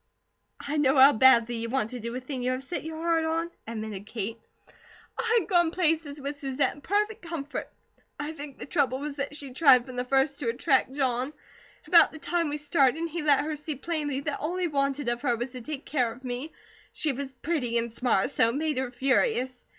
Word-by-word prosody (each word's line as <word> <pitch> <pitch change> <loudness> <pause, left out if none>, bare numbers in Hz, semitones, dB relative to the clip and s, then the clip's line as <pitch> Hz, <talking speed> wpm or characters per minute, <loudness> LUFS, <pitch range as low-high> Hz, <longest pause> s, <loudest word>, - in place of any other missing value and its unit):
"I 290 +2 -3
know 280 -1 +3
how 270 +2 +8
badly 240 -1 +5
you 230 0 -3
want 230 -3 -1
to 250 - -5
do 235 +1 -5
a - - -2
thing 260 0 -5
you 250 - 0
have 255 +1 -4
set 345 +6 -4
your 320 0 -6
heart 330 0 +1
on," 330 +1 -1 0.2
admitted 215 -3 -6
Kate. 225 0 -4 0.8
"I 465 0 +2
had - - -5
gone 345 -4 +3
places 320 -4 0
with 285 +1 -5
Susette 275 0 0
in 290 - -15
perfect 420 +5 0
comfort. 330 -4 -5 0.5
I 295 +1 -3
think 290 -3 -9
the - - -7
trouble 275 -4 +1
was 285 +1 -5
that 280 +1 -3
she 280 -3 -7
tried 260 -4 +6
from 255 -1 -9
the 250 - 0
first 270 +2 +1
to 250 -6 -1
attract 260 +2 +1
John. 260 0 -1 0.5
About 340 -3 +6
the - - -9
time 335 0 -1
we 295 - -2
started, 295 +1 +2
he 340 +1 -4
let 290 -1 +3
her 310 0 -2
see 300 0 -5
plainly 290 -2 -2
that 290 0 -3
all 340 +5 -2
he 365 - 0
wanted 275 -2 -1
of 240 0 -1
her 245 -4 +1
was 240 +2 -4
to 255 -1 -8
take 285 +3 -6
care 250 -6 0
of 245 +4 -13
me; 255 +5 -4 0.4
she 310 - -1
was 270 0 -5
pretty 255 -4 -1
and 235 -1 -2
smart, 240 -2 +1
so 225 - +3
it 235 - -3
made 300 -2 0
her 260 -1 -2
furious. 260 - 0
280 Hz, 220 wpm, -27 LUFS, 250-310 Hz, 0.8 s, how